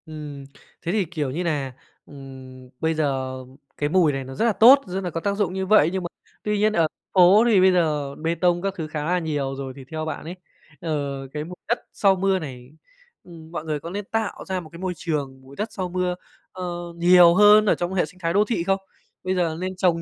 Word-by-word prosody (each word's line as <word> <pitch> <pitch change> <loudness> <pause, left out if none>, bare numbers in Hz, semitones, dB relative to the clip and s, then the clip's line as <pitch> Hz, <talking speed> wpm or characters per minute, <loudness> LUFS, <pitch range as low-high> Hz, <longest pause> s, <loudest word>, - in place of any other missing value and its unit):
Ừm, 150 -3 -8 0.4
thế 170 - -2
thì, 205 -1 +1
kiểu, 155 -5 -3
như 170 +7 -3
nà, 145 -6 -2 0.3
ừm, 130 -2 -12
bây 160 0 +1
giờ 135 -4 -1 0.4
cái 145 - -1
mùi 170 -2 +4
này 135 -1 -4
nó 130 +1 -9
rất 225 - 0
là 230 - +3
tốt, 245 +8 +7
rất 185 +1 -3
là 180 - -2
có 165 - -4
tác 200 +2 -1
dụng 200 -3 -1
như 190 0 -2
vậy, 190 -6 +5
nhưng 190 -1 -2
mà - - -2 0.4
tuy 210 0 0
nhiên 215 +1 +2
ở 165 -4 +3 0.3
phố 190 +4 +7
thì 210 -5 +5
bây 190 0 +6
giờ 150 -6 0
bê 165 +2 -2
tông 175 0 +1
các 195 0 -2
thứ 160 -3 -4
khá 155 -1 -4
là 180 +2 +1
nhiều 145 -5 -2
rồi. 135 -1 -6
Thì 135 - -10
theo 155 0 -3
bạn 155 - -5
ấy, 170 +3 -6 0.5
ờ, 140 -4 -3
cái 150 0 -3
mùi 180 +3 -9
đất 235 +2 +1
sau 195 -2 +3
mưa 190 0 +1
này, 130 -6 -9 0.5
ừm, 165 -2 -13
mọi 165 - -5
người 155 -2 -2
có 165 - -8
lên 200 +3 -5
tạo 225 -2 -2
ra 190 -1 -2
một 165 -3 -11
cái 170 - -12
môi 185 0 -2
trường 140 -5 -4
mùi 135 +1 -15
đất 210 +6 -4
sau 185 -2 -4
mưa, 180 0 -1 0.4
ơ, 185 - -7 0.3
nhiều 175 0 +6
hơn 210 +2 +7
ở 205 - +3
trong 175 +1 -3
hệ 185 - +1
sinh 180 +4 -17
thái 165 -1 -1
đô 205 +2 +4
thị 215 -7 -1
không? 195 +2 +1 0.4
Bây 185 0 -1
giờ 170 -3 0
nên 185 +1 -4
trồng 175 -2 +1
170 Hz, 245 wpm, -23 LUFS, 150-190 Hz, 0.5 s, tốt